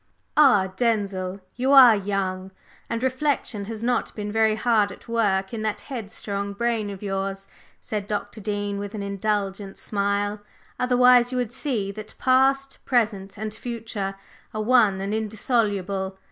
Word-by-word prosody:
"Ah, 210 -11 +5
Denzil, 200 -5 -1
you 260 +3 +1
are 255 -5 +9
young, 190 -2 -2 0.4
and 230 +1 -2
reflection 260 -5 -1
has 220 +1 -6
not 245 -1 0
been 210 -1 -4
very 220 0 +3
hard 215 -2 +2
at 200 - -13
work 205 -4 +1
in 225 - -3
that 215 -1 -2
headstrong 200 -5 -4
brain 225 -1 -1
of 200 0 -8
yours," 195 0 -3 0.3
said 210 -2 -4
Dr. 210 +1 -4
Dean 205 -1 -2
with 205 +1 -6
an 205 - -4
indulgent 200 -1 -2
smile, 205 0 -1 0.4
"otherwise 250 0 +5
you 255 - -2
would 245 -2 -2
see 245 -8 -1
that 215 +1 -9
past, 270 +1 +2
present 210 -6 0
and 215 +1 -4
future 220 -5 -4 0.4
are 215 - -1
one 220 -5 +4
and 200 +2 -2
indissoluble. 205 -3 -1
210 Hz, 145 wpm, -24 LUFS, 200-235 Hz, 0.4 s, are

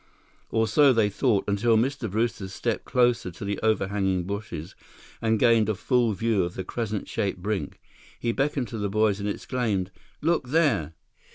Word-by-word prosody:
Or 110 0 +2
so 135 +5 +5
they 110 -3 +2
thought, 105 -2 +1
until 110 +3 +3
Mr. 125 0 0
Brewster 110 -1 -1
stepped 95 - -3
closer 120 -6 +2
to 90 +3 -8
the 100 -1 -2
overhanging 95 -3 +1
bushes 100 -4 -5 0.5
and 110 -1 +2
gained 115 -2 +4
a 110 - +1
full 120 +1 +1
view 110 0 +1
of 85 0 -4
the 95 - -4
crescent 110 0 -3
shaped 100 -5 -2
brink. 95 -5 -3 0.4
He 120 - 0
beckoned 135 0 -1
to 115 - -5
the 105 -1 -1
boys 105 0 +2
and 100 +1 -2
exclaimed: 105 -5 -2 0.3
"Look 160 -4 +1
there!" 120 - +2
110 Hz, 170 wpm, -26 LUFS, 100-120 Hz, 0.5 s, so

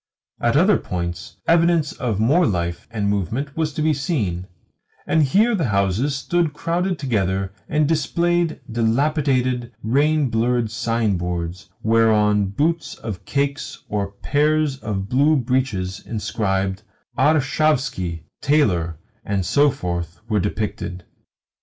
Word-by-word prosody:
At 120 +3 +3
other 185 +3 +4
points 85 -3 -5
evidence 165 -2 +3
of 115 -6 -2
more 150 +10 +4
life 85 -2 -2
and 105 -4 -2
movement 115 - -2
was 160 -1 0
to 150 - -2
be 155 0 +3
seen, 110 - -2 0.6
and 160 - +2
here 205 - +3
the 175 -8 +1
houses 100 +7 +1
stood 165 +2 0
crowded 175 +4 -1
together 95 -7 -1 0.2
and 150 -1 +2
displayed 170 +2 +1
dilapidated, 125 +1 +1
rain 145 +3 +2
blurred 115 0 +1
signboards 95 -7 -2
whereon 105 -2 +3
boots 160 - -1
or 110 - -2
cakes 140 0 -2
or 100 -1 -2
pairs 150 +4 +1
of 100 -6 -4
blue 140 +7 +3
breeches 120 -8 -1
inscribed 100 -3 -2 0.3
"Arshavski, 145 - +1 0.2
Tailor," 95 - +2 0.3
and 100 -3 -1
so 145 +7 +4
forth, 85 - -4
were 110 -2 +1
depicted. 100 -3 -3
120 Hz, 120 wpm, -21 LUFS, 100-150 Hz, 0.6 s, other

